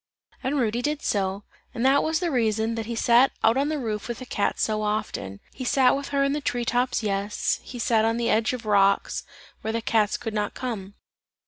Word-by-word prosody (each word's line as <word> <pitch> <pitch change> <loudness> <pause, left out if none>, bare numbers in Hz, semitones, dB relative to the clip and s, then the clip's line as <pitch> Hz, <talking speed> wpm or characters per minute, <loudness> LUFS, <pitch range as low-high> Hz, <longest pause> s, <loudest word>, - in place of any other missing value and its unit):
And 280 +3 -1
Rudy 235 -2 0
did 295 +3 -2
so, 195 0 -1 0.3
and 240 +1 -1
that 275 +2 +5
was 315 0 0
the 350 -2 -1
reason 225 -3 +1
that 225 -1 -4
he 235 - -3
sat 240 +3 +4
out 225 +1 +5
on 280 +2 +1
the 310 - -1
roof 215 -6 -3
with 240 - -4
the 255 - -8
cat 205 -4 -1
so 215 -1 0
often; 210 - -3
he 260 - -6
sat 255 0 +4
with 280 0 -4
her 280 -1 +1
in 275 0 +1
the 295 - -2
tree 245 -3 -1
tops, 245 0 0
yes, 200 0 -1
he 250 - -9
sat 230 -2 +2
on 225 +1 +1
the 235 -1 0
edge 220 0 +2
of 250 -2 -5
the 215 - -5
rocks, 200 -1 +3 0.4
where 220 - -2
the 230 - -1
cats 220 -2 +1
could 225 -2 -5
not 210 -1 -2
come. 205 -6 -5
230 Hz, 230 wpm, -25 LUFS, 215-255 Hz, 0.4 s, that